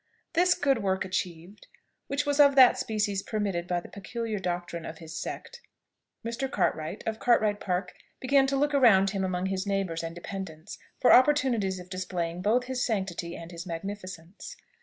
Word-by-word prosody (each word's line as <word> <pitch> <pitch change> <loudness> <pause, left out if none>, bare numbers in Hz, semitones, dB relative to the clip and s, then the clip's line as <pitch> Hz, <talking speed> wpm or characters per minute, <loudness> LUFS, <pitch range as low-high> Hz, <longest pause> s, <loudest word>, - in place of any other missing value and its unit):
This 360 +2 +4
good 275 -4 +1
work 190 -1 0
achieved, 185 +1 -5 0.4
which 285 +1 -1
was 290 0 0
of 280 -1 +7
that 260 -2 +8
species 205 -3 -1
permitted 195 -6 -2
by 175 -1 0
the - - -11
peculiar 220 +1 -5
doctrine 175 -2 -3
of 160 - -7
his 160 -1 -10
sect, 475 - -6 0.6
Mr. 235 +4 -2
Cartwright, 175 -4 -1
of 220 -1 -3
Cartwright 215 -4 +3
Park, 180 -1 -2 0.3
began 270 +1 +3
to 275 - 0
look 290 +1 +1
around 205 -8 +5
him 195 -2 -2
among 185 -1 -1
his 190 +1 -2
neighbours 195 -4 -1
and 165 0 -6
dependants 175 -3 -7 0.2
for 250 - +6
opportunities 255 -8 +4
of 180 0 -10
displaying 180 -2 -3
both 225 +6 +2
his 250 0 -2
sanctity 190 -6 -2
and 165 +1 -9
his 170 +1 -8
magnificence. 185 0 -7
195 Hz, 170 wpm, -28 LUFS, 175-240 Hz, 0.6 s, that